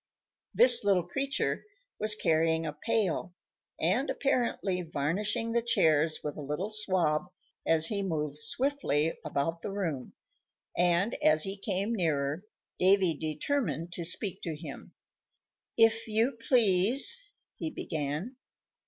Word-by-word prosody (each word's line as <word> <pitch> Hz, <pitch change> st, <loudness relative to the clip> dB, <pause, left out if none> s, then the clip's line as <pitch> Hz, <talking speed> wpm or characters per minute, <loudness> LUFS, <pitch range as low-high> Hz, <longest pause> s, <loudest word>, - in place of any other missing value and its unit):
This 245 Hz, -3 st, +8 dB
little 195 Hz, -3 st, +2 dB
creature 275 Hz, +7 st, -2 dB, 0.4 s
was 215 Hz, 0 st, +2 dB
carrying 165 Hz, -3 st, +1 dB
a 150 Hz, -, -4 dB
pail, 185 Hz, 0 st, -2 dB, 0.4 s
and 275 Hz, -, +1 dB
apparently 235 Hz, -9 st, -1 dB
varnishing 190 Hz, -, -2 dB
the 235 Hz, +1 st, +1 dB
chairs 160 Hz, -9 st, +2 dB
with 150 Hz, -, -5 dB
a -, -, -6 dB
little 150 Hz, +9 st, -4 dB
swab 185 Hz, -7 st, +1 dB, 0.4 s
as 160 Hz, -1 st, +4 dB
he 200 Hz, +3 st, -1 dB
moved 150 Hz, -6 st, -3 dB
swiftly 165 Hz, -, 0 dB
about 155 Hz, +2 st, -2 dB
the -, -, -5 dB
room; 170 Hz, -10 st, -4 dB, 0.6 s
and, 175 Hz, +4 st, +2 dB
as 155 Hz, 0 st, +4 dB
he 195 Hz, 0 st, -1 dB
came 200 Hz, +2 st, -2 dB
nearer, 155 Hz, -4 st, -1 dB, 0.4 s
Davy 185 Hz, -3 st, +3 dB
determined 160 Hz, -, -3 dB
to 170 Hz, -, -4 dB
speak 185 Hz, +3 st, -1 dB
to 165 Hz, -3 st, -4 dB
him. 150 Hz, -2 st, -10 dB, 0.8 s
"If 225 Hz, 0 st, +3 dB
you 225 Hz, +4 st, 0 dB
please," 240 Hz, -, +4 dB, 0.4 s
he 320 Hz, -, -4 dB
began. 160 Hz, -, -5 dB
180 Hz, 125 wpm, -29 LUFS, 155-220 Hz, 0.8 s, This